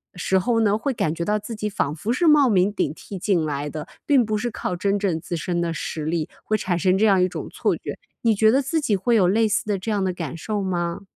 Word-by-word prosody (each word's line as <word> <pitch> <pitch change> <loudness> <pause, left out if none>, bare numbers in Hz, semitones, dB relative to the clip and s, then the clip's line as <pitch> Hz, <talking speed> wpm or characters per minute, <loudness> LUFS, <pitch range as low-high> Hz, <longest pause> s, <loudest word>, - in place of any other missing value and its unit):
时 190 +1 +1
候 230 +4 +1
呢， 210 -1 +3
会 265 +4 -2
感 160 -7 -1
觉 170 - -3
到 210 0 +1
自 220 +2 -7
己 210 0 -3
仿 150 -6 -1
佛 210 +9 -3
是 335 +5 +1
冒 290 -4 +6
名 195 0 +3
顶 150 - -1
替 195 +3 -9
进 185 -4 +1
来 145 0 -3
的， 155 0 -6 0.2
并 270 -6 +4
不 215 0 -1
是 240 +3 -2
靠 180 - -3
真 200 +3 0
正 180 -5 0
自 170 - -5
身 175 +2 -2
的 170 -1 -1
实 155 -2 -4
力， 160 -1 -1
会 215 - 0
产 180 -3 -1
生 185 +1 +3
这 220 - +3
样 195 -3 +4
一 180 - +4
种 - - -6
错 - - 0
觉， - - -7 0.2
你 225 -2 +3
觉 220 +2 +5
得 270 +3 +3
自 295 +5 -1
己 215 -7 +1
会 230 +5 +1
有 185 -5 +4
类 220 +4 +3
似 215 +1 0
的 205 -2 0
这 215 +4 -4
样 200 -2 0
的 185 -1 0
感 165 -3 -5
受 210 +4 -3
吗？ 175 -2 -2
200 Hz, 295 characters per minute, -23 LUFS, 175-220 Hz, 0.2 s, 冒